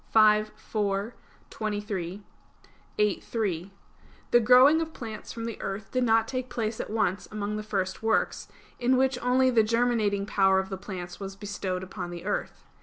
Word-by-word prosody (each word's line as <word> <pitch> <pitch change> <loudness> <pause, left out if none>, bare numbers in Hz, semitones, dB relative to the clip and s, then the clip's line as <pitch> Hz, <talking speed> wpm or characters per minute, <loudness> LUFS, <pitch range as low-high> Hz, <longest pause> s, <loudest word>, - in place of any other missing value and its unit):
v, 215 -1 +6
4, 205 0 -2 0.4
23; 205 -3 -4 0.7
viii, 210 -2 +2
3), 195 -5 -3 0.6
the 240 - +7
growing 255 +7 +6
of 320 0 -4
plants 220 -3 -7
from 230 -1 -5
the 230 -2 -5
earth 195 +1 -5
did 255 -1 +1
not 225 -1 +3
take 255 0 -3
place 225 -2 -2
at - - -4
once 205 -3 0
among 210 0 -3
the 215 - -3
first 195 -3 -2
works, 225 0 0 0.3
in 255 +1 +3
which 260 -1 +2
only 255 +1 +3
the 230 -2 +5
germinating 220 -3 +1
power 190 -2 +3
of 190 0 -1
the 190 - -3
plants 180 -2 -7
was 195 -1 -6
bestowed 195 -2 -4
upon 180 -1 -6
the 175 0 -8
earth. 205 - -3
215 Hz, 170 wpm, -27 LUFS, 195-235 Hz, 0.7 s, the